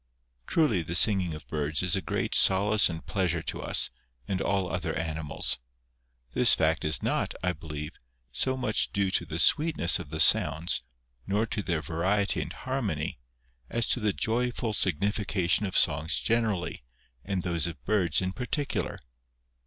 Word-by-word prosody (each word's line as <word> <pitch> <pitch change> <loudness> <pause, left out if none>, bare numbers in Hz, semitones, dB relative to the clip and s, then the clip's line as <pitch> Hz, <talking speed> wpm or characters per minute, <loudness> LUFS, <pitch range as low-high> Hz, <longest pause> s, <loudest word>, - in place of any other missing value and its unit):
Truly 125 - +2
the 85 +1 -5
singing 90 -5 +3
of 75 - -11
birds 75 +2 -2
is 90 -2 +2
a 95 - -1
great - - -2
solace 100 +2 +4
and 80 -1 -7
plea 95 -2 -1
sure 85 -1 -2
to - - -4
us, - - 0 0.4
and 95 - -2
all 95 -2 0
other 85 -3 -3
animals. 80 -4 -1 0.7
This - - +7
fact - - +1
is - - -1
not, - - -1
I 90 0 +1
believe, 75 -3 -7 0.4
so 130 - 0
much 120 -5 0
due 100 -1 0
to - - 0
the - - -5
sweetness 150 - +2
of 85 -5 -8
the 80 +1 -5
sounds, 80 +1 +3 0.5
nor 105 +3 +1
to 110 - -3
their 85 -5 -2
variety 95 +6 0
and - - -5
harmony, 100 - -3 0.5
as 115 -1 +2
to - - +4
the 105 -2 +1
joyful 115 - -1
significa 100 +1 +1
tion 100 +4 +3
of 95 - 0
songs 80 0 +2
generally, 110 -5 -1 0.4
and 95 -2 -3
those 85 -3 0
of 85 - -9
birds 95 -5 +2
in 95 - -1
particular. 135 +6 -3
95 Hz, 165 wpm, -28 LUFS, 80-105 Hz, 0.7 s, This